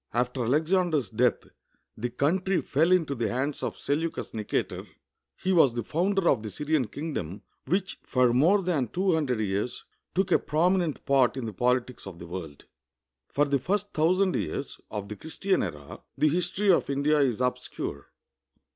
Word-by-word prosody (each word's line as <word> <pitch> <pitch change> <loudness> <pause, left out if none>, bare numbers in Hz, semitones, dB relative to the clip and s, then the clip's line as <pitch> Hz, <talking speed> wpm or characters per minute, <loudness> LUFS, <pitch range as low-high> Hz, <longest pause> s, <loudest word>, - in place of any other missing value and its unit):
After 125 0 0
Alexander's 155 - +1
death 120 +2 +2 0.5
the 120 +3 -3
countr}^ 180 +9 0
fell 160 +5 +2
into 165 -6 +3
the 115 -5 -1
hands 135 +5 -2
of - - -3
Seleucus 160 +3 -2
Xicator. 105 -2 -3 0.5
He 190 - 0
was 140 -9 +5
the 120 - -2
founder 185 - 0
of 125 - +3
the 110 - -5
SvTian 150 +1 -1
kingdom, 110 - -5 0.2
which 190 +2 -1
for 125 -2 +2
more 175 +11 +4
than 160 -8 0
two 185 - +1
hundred 140 -8 0
years 100 +3 -2 0.3
took 190 0 +1
a - - +5
prominent 170 +1 +1
part 135 -1 +3
in 130 - -3
the 110 - -5
pohtics 125 +1 0
of 95 -3 -8
the 85 - -9
world. 85 -5 -8 0.6
For 145 - +1
the 140 -1 +1
first 205 +7 -2
thousand 185 +4 +2
\'ears 140 - -3
of 105 -2 -5
the 105 - -6
Christian 185 - -1
era, 75 -6 -6 0.2
the 155 - +4
his 175 +3 0
tor} 200 0 +3
of - - -5
India 145 +2 +2
is 130 -6 +2
obscure. 125 - -3
140 Hz, 170 wpm, -27 LUFS, 120-175 Hz, 0.6 s, was